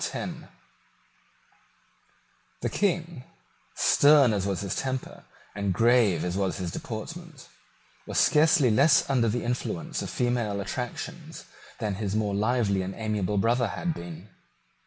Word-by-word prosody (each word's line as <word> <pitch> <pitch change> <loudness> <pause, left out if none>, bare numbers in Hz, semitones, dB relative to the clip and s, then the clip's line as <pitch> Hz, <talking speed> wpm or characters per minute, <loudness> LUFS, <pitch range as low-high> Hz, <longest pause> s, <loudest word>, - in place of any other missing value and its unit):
The - - -1
King, 170 -7 -1 0.5
stern 140 -5 +5
as 100 -1 -1
was 95 -3 -2
his 100 -2 -3
temper 130 -1 -4 0.3
and 100 -2 -2
grave 115 -6 +3
as 90 0 -2
was 95 -1 -1
his 90 -3 -4
deportment, 155 - -8 0.6
was - - -4
scarcely 150 -4 +4
less 125 +8 +4
under 125 -4 +2
the 120 +3 -2
influence 120 -8 -3
of - - -5
female 120 -5 -1
attractions 120 +4 -6 0.3
than 105 -2 -2
his 100 -1 -2
more 105 -2 0
lively 105 -2 +1
and 95 +1 -5
amiable 105 -2 -2
brother 120 +4 +2
had 170 - -3
been. 85 - -9
110 Hz, 125 wpm, -27 LUFS, 100-130 Hz, 0.6 s, stern